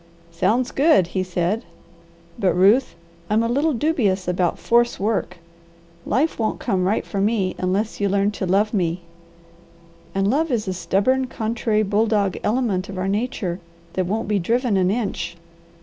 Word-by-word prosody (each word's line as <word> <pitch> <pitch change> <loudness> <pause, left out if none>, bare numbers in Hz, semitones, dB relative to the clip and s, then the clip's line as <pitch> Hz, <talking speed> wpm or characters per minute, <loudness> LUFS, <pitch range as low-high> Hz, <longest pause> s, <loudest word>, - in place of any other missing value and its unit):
"Sounds 215 +9 +1
good!" 290 - +4
he 190 - 0
said. 185 +4 -1 0.8
"But, 185 -5 +2
Ruth, 200 +5 +4 0.3
I'm 215 +2 +2
a - - +1
little 285 +6 +1
dubious 225 - 0
about 180 -1 0
force 240 0 +2
work. 210 -2 -1 0.7
Life 275 +7 +1
won't 220 - -1
come 185 -2 0
right 205 +4 0
for 200 - -3
me 200 -3 +1
unless 195 +4 -1
you 200 - +2
learn 200 +1 +2
to 195 -2 -4
love 205 +4 +2
me, 175 -3 0 1.1
and 195 0 +1
love 305 +9 +1
is 230 -5 -1
a 190 - -1
stubborn, 195 +10 +1
contrary 220 -2 -1
bulldog 210 -1 +1
element 210 -5 0
of 195 - -6
our 185 +1 -1
nature 195 -4 -2 0.3
that 185 -1 -1
won't 215 +3 -2
be 210 -1 +1
driven 230 +4 +1
an 185 -1 +2
inch. 190 -6 -2
205 Hz, 160 wpm, -22 LUFS, 185-230 Hz, 1.1 s, good